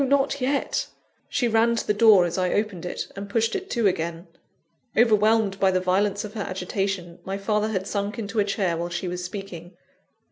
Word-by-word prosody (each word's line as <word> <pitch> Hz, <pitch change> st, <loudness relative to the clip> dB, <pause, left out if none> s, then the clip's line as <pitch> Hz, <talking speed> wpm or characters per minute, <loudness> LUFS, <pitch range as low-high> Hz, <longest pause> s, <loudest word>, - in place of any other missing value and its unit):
not 275 Hz, 0 st, +1 dB
yet!" 275 Hz, +2 st, 0 dB, 0.4 s
She 245 Hz, -, +1 dB
ran 230 Hz, +1 st, +3 dB
to -, -, -2 dB
the 210 Hz, -, +2 dB
door 210 Hz, -4 st, +6 dB
as 170 Hz, 0 st, -3 dB
I 185 Hz, -1 st, 0 dB
opened 205 Hz, -5 st, -1 dB
it, -, -, -5 dB
and 200 Hz, 0 st, -7 dB
pushed 225 Hz, +2 st, +1 dB
it 390 Hz, 0 st, -4 dB
to 235 Hz, -3 st, 0 dB
again. 170 Hz, -2 st, -1 dB, 0.7 s
Overwhelmed 215 Hz, -3 st, +3 dB
by 195 Hz, -, +4 dB
the 185 Hz, -1 st, +2 dB
violence 195 Hz, +2 st, +1 dB
of 210 Hz, 0 st, -7 dB
her 220 Hz, -, -4 dB
agitation, 185 Hz, -2 st, -3 dB
my 195 Hz, +1 st, -3 dB
father 210 Hz, +1 st, 0 dB
had 190 Hz, -4 st, -2 dB
sunk 205 Hz, +2 st, -3 dB
into 220 Hz, -1 st, -3 dB
a -, -, +5 dB
chair 195 Hz, -3 st, 0 dB
while 170 Hz, +1 st, -3 dB
she 175 Hz, +2 st, -3 dB
was 180 Hz, 0 st, -4 dB
speaking. 180 Hz, -2 st, -7 dB
200 Hz, 200 wpm, -25 LUFS, 185-220 Hz, 0.7 s, door